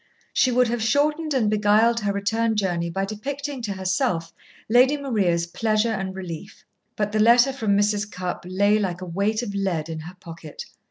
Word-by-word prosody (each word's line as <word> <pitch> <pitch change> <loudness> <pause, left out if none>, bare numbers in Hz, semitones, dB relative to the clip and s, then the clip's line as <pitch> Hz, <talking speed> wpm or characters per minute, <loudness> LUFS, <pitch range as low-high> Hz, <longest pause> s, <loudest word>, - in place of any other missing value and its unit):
She 255 - +3
would 250 0 +3
have 235 0 -2
shortened 295 +6 +1
and 235 -5 +2
beguiled 215 +2 +3
her 205 -2 -1
return 220 +3 0
journey 175 -4 -1
by 195 +3 -2
depicting 275 +6 -5
to 210 -4 -3
herself 190 -2 -1 0.3
Lady 255 +6 +4
Maria's 200 -12 0
pleasure 215 +5 0
and 190 -2 -4
relief. 175 -4 -8 0.3
But 210 -1 -1
the 215 - 0
letter 240 +4 +5
from 215 -6 +1
Mrs. 205 0 +1
Cupp 180 0 -5
lay 200 +3 +3
like 185 -3 -2
a - - -5
weight 200 +6 -1
of 205 -4 -5
lead 180 -6 -2
in 160 -1 -5
her 175 +4 -10
pocket. 165 -4 -10
210 Hz, 180 wpm, -23 LUFS, 185-235 Hz, 0.3 s, letter